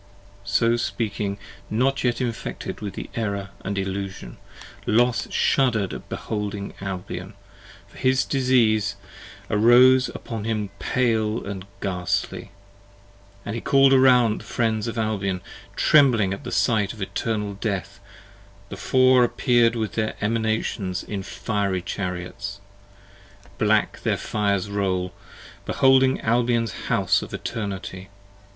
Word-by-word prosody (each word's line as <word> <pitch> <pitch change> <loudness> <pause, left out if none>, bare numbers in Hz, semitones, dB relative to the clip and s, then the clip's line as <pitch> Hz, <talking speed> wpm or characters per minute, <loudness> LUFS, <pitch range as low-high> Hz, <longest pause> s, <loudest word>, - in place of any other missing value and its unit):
27 - - -27 0.3
So - - +1
speaking 105 -4 -2 0.3
not 130 +5 +1
yet 120 -2 +1
infected 120 -4 -4
with 105 -2 -5
the - - -6
Error 100 -3 -3
& - - -7
Illusion 95 -8 -4 0.5
p. - - -24
40 110 - +2
LOS 120 0 +2
shudder'd 115 -8 +2
at - - -9
beholding 105 -2 -4
Albion, 95 -2 -6 0.5
for - - -16
his 130 0 +2
disease 120 -6 +2 0.5
Arose 125 +5 +6
upon 115 -4 -6
him 105 -3 -2
pale 115 -3 0
and 100 -1 -6
ghastly: 90 -3 -2 1.0
and 105 - -3
he 115 - -4
call'd 135 0 +5
around 125 -4 +5
The - - -14
friends 110 -1 -1
of 115 0 -4
Albion: 100 -4 -1 0.4
trembling 120 -10 +4
at 100 - -7
the - - -5
sight 105 -5 +1
of 110 - -12
Eternal 105 0 -2
Death 100 -4 -3 0.7
The - - -7
four 130 -1 +4
appear'd 120 -1 +3
with 110 -2 -2
their 110 -1 -1
Emanations 110 -4 -1
in 100 -2 -4
fiery 100 -1 -2
5 - - -22
Chariots: 95 +1 -5 1.0
black 105 0 +2
their - - 0
fires 100 -2 -1
roll, 95 -3 -1 0.5
beholding 130 0 +4
Albion's 115 -1 0
House - - +2
of - - -6
Eternity. 95 -3 -5
110 Hz, 130 wpm, -24 LUFS, 100-120 Hz, 1.0 s, Arose